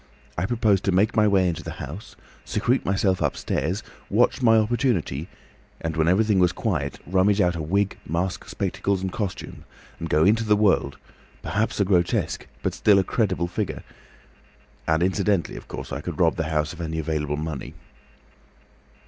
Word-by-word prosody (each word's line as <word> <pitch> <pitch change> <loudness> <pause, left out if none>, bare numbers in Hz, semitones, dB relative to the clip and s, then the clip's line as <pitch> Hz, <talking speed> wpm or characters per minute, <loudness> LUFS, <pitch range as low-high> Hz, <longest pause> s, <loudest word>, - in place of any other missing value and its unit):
I 90 +3 -1
proposed 110 -5 +2
to 100 - +2
make 100 +5 +2
my 110 -2 +4
way 95 -2 +3
into 85 -2 -2
the - - -6
house, 80 +11 -8 0.3
secrete 120 +5 0
myself 95 -1 +1
upstairs, 95 +6 -1 0.3
watch - - +2
my 115 -2 +5
opportunity, 105 - 0 0.5
and 80 -1 -3
when 80 0 +2
everything 100 +2 +3
was 90 -1 +4
quiet, 75 - -2
rummage 95 +4 +2
out 90 -3 +3
a 85 - -3
wig, 100 +6 0
mask, 90 +4 -2
spectacles, 95 -2 -1
and 95 - -2
costume, 100 -2 -5 0.4
and 85 - -4
go 75 - +3
into 110 +3 +4
the 105 -1 +3
world, 100 -10 +2 0.5
perhaps 105 +1 -1
a 100 - +3
grotesque 90 -3 0 0.2
but - - 0
still 105 -2 +4
a 95 - +4
credible 95 -5 0
figure. 95 +3 -3 1.0
And 80 +1 +2
incidentally 95 -2 +1
of - - -10
course - - -7
I 70 - -3
could 85 +1 -6
rob 85 -3 +3
the 80 -2 -2
house 75 0 0
of 85 - -8
any 80 -1 -3
available 75 -2 -2
money. 75 -3 -5
95 Hz, 170 wpm, -24 LUFS, 80-105 Hz, 1.0 s, my